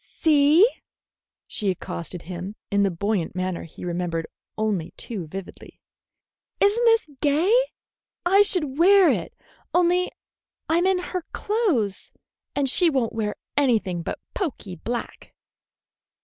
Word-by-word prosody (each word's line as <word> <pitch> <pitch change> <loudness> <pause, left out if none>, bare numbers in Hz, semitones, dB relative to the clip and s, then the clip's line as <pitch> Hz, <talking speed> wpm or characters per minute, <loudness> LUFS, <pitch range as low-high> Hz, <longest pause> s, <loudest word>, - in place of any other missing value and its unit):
"See," 310 +5 +4 0.8
she 205 - -1
accosted 175 -1 -5
him, 180 +4 -6 0.2
in 200 0 +3
the 200 - +3
buoyant 190 0 -2
manner 185 -1 -3
he 165 - -10
remembered 170 -2 -2 0.3
only 210 -7 -2
too 195 -9 -5
vividly, 190 +3 -9 0.8
"is 405 +1 +4
n't 475 +1 +1
this 455 -9 +3
gay? 310 +8 +3 0.7
I 390 +3 +6
should 310 -8 +1
wear 385 +1 +7
it, - - -3 0.4
only 360 +1 +3 0.6
I'm 340 +3 +2
in 380 -1 +3
her 360 0 -4
clothes, 360 - -1 0.4
and 285 -1 +1
she 340 +6 +5
won't 260 -6 0
wear 215 -2 -2 0.2
anything 225 -11 +1
but - - -4 0.2
poky 255 - -4
black." 235 +8 -6
250 Hz, 125 wpm, -24 LUFS, -, 0.8 s, wear